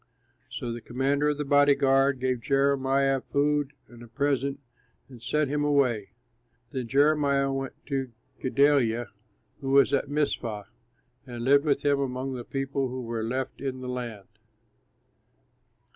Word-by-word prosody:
So 120 - -5
the 120 0 -6
commander 140 +5 0
of 150 - -1
the 150 - -3
body 145 0 +5
guard 135 0 +3
gave 130 -2 -1
Jeremiah 135 0 +2
food 145 0 0
and 120 -1 -15
a 120 - -11
present, 140 +2 -1 0.5
and 125 -3 -14
sent 150 +3 0
him 145 0 0
away. 130 -8 +1 0.6
Then 130 -3 -4
Jeremiah 140 0 +3
went 135 -1 -3
to 135 -3 -3 0.3
Gedaliah, 125 -4 +2 0.5
who 135 - -4
was 140 +1 +5
at 140 0 +1
Mizpah, 125 -8 -1 0.6
and 120 -1 -6
lived 140 +3 +4
with 140 -2 +1
him 140 -1 +3
among 130 0 -3
the 125 -2 -5
people 135 +1 -2
who 130 0 -5
were 115 -1 -3
left 130 +4 -3
in 130 -2 -4
the 130 - -6
land. 120 -5 -5
135 Hz, 145 wpm, -27 LUFS, 125-140 Hz, 0.6 s, body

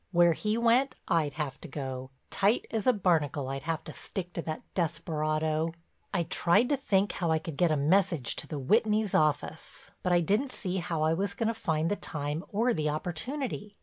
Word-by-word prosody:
Where 175 -1 +5
he 210 +6 -1
went 240 +3 +3
I'd 155 -5 +1
have 150 -3 -4
to - - -8
go, 130 -2 -5 0.2
tight 205 +4 +2
as 220 -1 -1
a - - +8
barnacle 155 - +1
I'd 135 0 -3
have 165 +3 -2
to - - -9
stick 180 -2 -5
to 170 - -2
that 155 -1 -5
desperado. 160 -1 0 0.4
I 175 -4 +1
tried 180 +8 +3
to 290 - +3
think 205 -7 +1
how 170 -3 -2
I 160 - +3
could 160 -1 -6
get 175 +4 +3
a 155 - +2
message 160 -2 +2
to - - -2
the 150 - -4
Whitneys' 215 - +2
office, 155 +1 -1
but 180 - 0
I 175 0 +5
didn't 215 - +1
see 185 -2 -3
how 165 -3 -1
I 160 +1 +3
was 200 +4 -1
going 225 -1 0
to - - 0
find 160 -5 -1
the - - +2
time 150 -2 -3
or 235 +4 +2
the 150 -5 0
opportunity. 205 - -4
170 Hz, 205 wpm, -29 LUFS, 155-205 Hz, 0.4 s, a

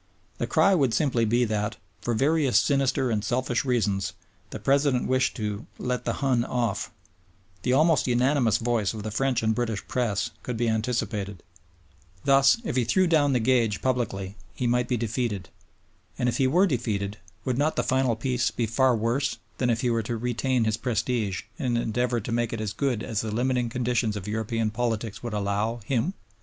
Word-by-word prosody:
The - - -1
cry 195 - +4
would 135 - +2
simply 125 -4 +2
be 120 +3 +2
that, 105 0 -2 0.2
for 120 - -1
various 140 +1 +3
sinister 135 -2 +1
and 105 -2 0
selfish 120 +2 0
reasons, 105 -7 0 0.4
the - - -6
President 140 -2 +2
wished 130 0 +1
"to 105 0 -4
let 125 0 -2
the - - 0
Hun 125 -3 +3
off." 120 -5 -2 0.7
The 125 - +1
almost 155 +2 +4
unanimous 125 -2 +3
voice 115 -3 0
of 105 - -6
the 110 - -4
French 125 +1 0
and 110 0 +2
British 115 -3 -2
Press 115 -6 -1
could 125 -2 -4
be 120 +1 0
anticipated. 110 -3 -2 0.8
Thus, 135 +3 +5
if 130 - -2
he 125 - +3
threw 185 +11 +3
down 150 -5 +3
the 125 - +3
gage 115 -3 +1
publicly 105 -7 -1 0.2
he 125 - -2
might 125 +1 +2
be 125 - 0
defeated. 115 -4 -2 0.7
And 125 - 0
if 120 - 0
he 135 - +3
were 175 +9 +4
defeated, 105 - -2 0.3
would 130 0 0
not 155 +2 +1
the - - +1
final 130 -3 +1
Peace 125 +2 0
be 120 - -2
far 125 +3 +3
worse 125 +5 0 0.2
than 125 - +1
if 115 0 +1
he 125 - +1
were 115 -1 +1
to 115 +2 -3
retain 125 +1 0
his 110 0 0
prestige 115 -4 -1 0.2
and 125 -3 0
endeavor 120 +1 0
to 115 - -6
make 120 0 0
it 115 - -3
as 110 -2 -3
good 125 -6 -1
as 110 -3 -2
the 110 - -4
limiting 125 +2 0
conditions 120 -2 0
of 100 -1 -6
European 110 +1 -1
politics 115 -2 -2
would 120 -2 -5
allow, 105 +3 -1
him? 135 - 0
120 Hz, 190 wpm, -26 LUFS, 110-130 Hz, 0.8 s, Thus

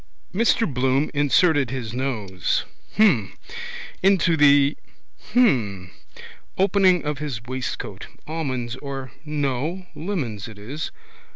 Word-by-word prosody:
Mr 230 +3 +3
Bloom 130 - +1
inserted 145 - +3
his 120 -4 -4
nose. 110 -8 -1 0.3
Hm. 140 - +4 0.7
Into 185 -3 +4
the. 145 -1 +5 0.6
Hm. 105 - +2 0.7
Opening 190 -3 +4
of 150 -2 -2
his 135 -7 -4
waistcoat. 130 +1 -5 0.2
Almonds 130 -7 -3
or. 135 -2 -6
No. 150 +4 -2
Lemons 140 - -3
it 110 -2 -11
is. 135 +10 -5
140 Hz, 100 wpm, -23 LUFS, 125-165 Hz, 0.7 s, the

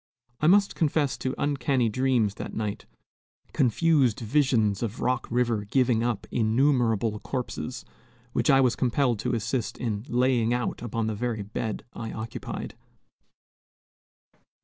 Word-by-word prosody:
I 155 - +2
must 200 +3 +5
confess 150 -3 +1
to 130 +1 -2
uncanny 135 -3 +1
dreams 120 -2 +1
that - - -6
night, 105 -2 -4 0.7
confused 135 -1 +3
visions 115 -5 +2
of 115 0 -3
Rock 125 0 0
River 120 -3 +1
giving 120 0 +2
up 120 -3 -1
innumerable 115 -2 +2
corpses, 125 0 -5 0.5
which - - +1
I 135 -1 +6
was 125 -2 +3
compelled 125 -2 +1
to 125 +2 -1
assist 115 +2 -2
in 105 -4 -3
"laying 120 -1 +2
out" 125 - -3
upon 115 -1 -2
the 110 - -1
very 110 -1 -2
bed 105 +1 -4
I 115 -1 -6
occupied. 110 +1 -6
120 Hz, 130 wpm, -26 LUFS, 110-130 Hz, 0.7 s, I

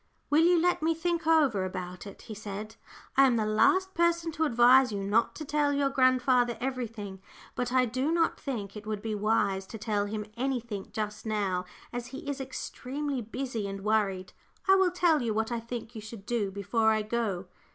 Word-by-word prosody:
"Will 310 +2 +5
you 350 0 +5
let 355 0 +2
me 325 +1 +2
think 335 0 -1
over 290 -12 +4
about 185 0 -5
it?" 200 - -11
he 220 - -8
said. 210 +1 -7 0.4
"I 275 - +7
am 250 - +2
the 220 -2 +1
last 375 - +3
person 340 -1 +1
to 315 +1 0
advise 250 -1 +6
you 200 -1 -3
not 210 +4 +1
to 310 - -6
tell 290 0 +1
your 280 -1 +1
grandfather 255 -2 +3
everything, 230 -6 -4 0.3
but 245 0 -2
I 255 0 +4
do 260 +6 -1
not 335 -1 +1
think 215 -8 -5
it 210 0 -9
would 215 -1 -3
be 220 -1 -2
wise 205 -2 +1
to 225 - -7
tell 205 -2 -1
him 210 0 -4
anything 235 -5 -3
just 210 0 -4
now, 195 -4 -1 0.3
as 245 0 -4
he 270 +2 -9
is 285 -1 -3
extremely 270 +1 -4
busy 230 -1 -4
and 195 0 -6
worried. 200 -3 0 0.3
I 385 - +7
will 380 -1 +5
tell 345 -4 +2
you 225 -3 -1
what 220 +2 0
I 235 - -1
think 235 0 -7
you 220 - -7
should 215 -2 -10
do 230 -4 0
before 205 +3 +1
I 215 -1 +2
go." 210 -4 -2
235 Hz, 200 wpm, -29 LUFS, 210-275 Hz, 0.4 s, I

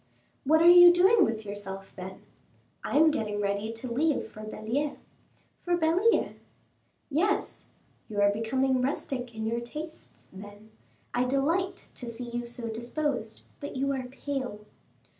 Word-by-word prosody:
"What 315 +3 +5
are - - +6
you 350 0 +10
doing 380 +4 +5
with 220 -7 -1
yourself, 195 -1 -7
then?" 190 0 -9 0.6
"I - - 0
am 315 +1 +6
getting 210 -7 -2
ready 200 +2 -1
to 230 +3 -7
leave 280 +4 0
for 215 - -10
Belliere." 225 +7 -3 0.6
"For 350 -1 0
Belliere?" 350 +7 +2 0.7
"Yes." 380 +8 0 0.4
"You 210 -1 -3
are 200 0 +5
becoming 255 +5 0
rustic 250 -2 -3
in 220 0 -4
your 230 +1 -1
tastes, 305 +6 -9
then; 205 +2 -12 0.4
I 245 +1 +1
delight 330 +9 -1
to 245 - -7
see 235 +1 -6
you 240 0 -3
so 235 0 -5
disposed. 235 0 -3 0.2
But 285 - -7
you 275 +1 0
are 260 -2 -4
pale." 260 -4 -5
250 Hz, 145 wpm, -28 LUFS, 220-305 Hz, 0.7 s, you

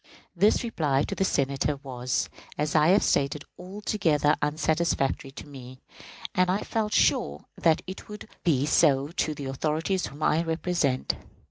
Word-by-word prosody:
This 205 +8 +3
reply 150 - 0
to - - -3
the - - 0
Senators 140 -3 0
was, 125 -2 -2 0.3
as 150 0 -1
I 155 -1 +4
have 195 +4 +5
stated, 140 +1 +1 0.2
altogether 180 -6 +1
unsatisfactory 150 -2 0
to - - -9
me, 130 -2 -11 0.6
and 185 0 +2
I 195 +3 0
felt 215 -2 -2
sure 70 +1 +2
that 165 -1 +2
it 190 +3 -9
would 210 0 -8 0.2
be 145 -5 +2
so 145 -2 +3
to 155 -2 -1
the 140 - -6
authorities 155 +7 -1
whom 145 +2 -8
I 160 - +3
represented. 165 -5 0
155 Hz, 150 wpm, -27 LUFS, 140-180 Hz, 0.6 s, have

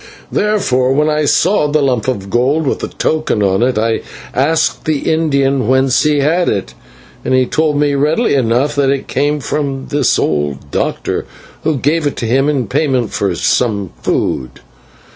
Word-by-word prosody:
"Therefore, 135 -12 +1
when 150 +2 +2
I 150 0 +1
saw 170 +2 +2
the 150 0 +1
lump 130 -3 0
of 100 -7 -3
gold 135 +6 +1
with 135 - -1
the - - -3
token 155 -9 -1
on 95 +1 +1
it, 125 -1 +1
I 115 +1 0 0.3
asked 155 +5 0
the 155 -3 0
Indian 140 -6 +1
whence 130 0 +3
he 150 -2 +2
had 165 +5 +2
it, 80 -11 -3 0.5
and 130 - +1
he 130 0 +3
told 150 +2 0
me 145 -1 +2
readily 150 - +1
enough 130 +2 +1
that 140 -1 +2
it 135 -1 -1
came 145 +1 0
from 140 -2 -3
this 145 -3 +2
old 75 -2 -2
doctor, - - -2 0.4
who 155 -2 0
gave 150 +4 +1
it 145 - -3
to - - -4
him 135 +5 +2
in 135 -5 0
payment 130 -1 0
for 95 -3 -1
some 100 -2 0
food. 65 0 -2
135 Hz, 175 wpm, -15 LUFS, 120-150 Hz, 0.5 s, whence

